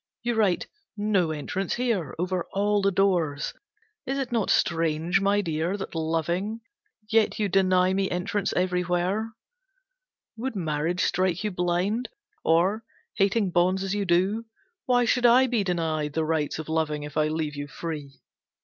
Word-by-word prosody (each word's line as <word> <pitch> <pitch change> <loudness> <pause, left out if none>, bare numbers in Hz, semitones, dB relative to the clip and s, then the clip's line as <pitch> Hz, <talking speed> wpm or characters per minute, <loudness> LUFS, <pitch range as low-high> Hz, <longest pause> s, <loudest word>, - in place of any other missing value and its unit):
You 240 0 0
write 210 -6 +2 0.3
`No 190 -7 +1
Entrance 185 +5 -2
Here', 230 - -1
over 180 +1 -2
all 205 +1 +2
the 195 - +3
doors. 175 -7 +1 0.5
Is 270 +1 -1
it 265 -3 -3
not 230 -4 0
strange, 165 +2 +2
my 200 +1 +3
Dear, 165 +2 -1
that 195 - -6
loving, 170 +7 -1 0.5
yet 220 0 +2
you 210 - +1
deny 185 -1 +3
me 195 0 0
entrance 180 +3 -1
everywhere. 180 +4 0 1.0
Would 245 +1 -3
marriage 165 0 -1
strike 185 0 +1
you 210 - -1
blind, 180 +6 0 0.3
or, 185 +7 +2 0.3
hating 200 0 +1
bonds 185 +2 +2
as 195 0 -2
you 205 -1 -1
do, 190 +6 +1 0.4
why 245 -1 +4
should 245 +1 +3
I 250 +2 +6
be 240 -5 +1
denied 160 -5 -1
the 160 0 0
rights 155 -2 -1
of 160 - -6
loving 155 -2 -1
if 150 0 -8
I 155 0 +2
leave 155 -1 -2
you 145 0 -5
free? 145 -1 -7
185 Hz, 155 wpm, -26 LUFS, 160-205 Hz, 1.0 s, I